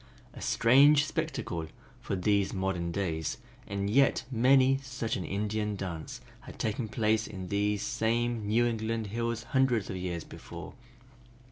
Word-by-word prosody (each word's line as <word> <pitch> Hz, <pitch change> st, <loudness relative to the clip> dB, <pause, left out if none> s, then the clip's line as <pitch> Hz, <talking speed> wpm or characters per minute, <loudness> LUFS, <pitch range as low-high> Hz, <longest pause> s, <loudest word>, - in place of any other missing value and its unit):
A -, -, -10 dB
strange 140 Hz, +5 st, +5 dB
spectacle 155 Hz, -, -3 dB, 0.3 s
for -, -, -3 dB
these 100 Hz, +1 st, +1 dB
modern 95 Hz, -3 st, -1 dB
days, 85 Hz, -4 st, -2 dB, 0.3 s
and 100 Hz, 0 st, -2 dB
yet 135 Hz, +6 st, +3 dB
many 130 Hz, +2 st, +4 dB
such 125 Hz, -4 st, -3 dB
an 95 Hz, -, -3 dB
Indian 105 Hz, +1 st, -2 dB
dance 90 Hz, -5 st, -6 dB, 0.2 s
had -, -, -12 dB
taken 110 Hz, +2 st, -2 dB
place 110 Hz, 0 st, +1 dB
in 95 Hz, -3 st, -7 dB
these 105 Hz, 0 st, 0 dB
same 115 Hz, -1 st, 0 dB
New 115 Hz, +3 st, +3 dB
England 115 Hz, -1 st, -1 dB
hills 115 Hz, 0 st, -2 dB
hundreds 130 Hz, -6 st, +2 dB
of 95 Hz, -, -4 dB
years 90 Hz, -2 st, -3 dB
before! 85 Hz, +2 st, -10 dB
110 Hz, 140 wpm, -30 LUFS, 95-120 Hz, 0.3 s, strange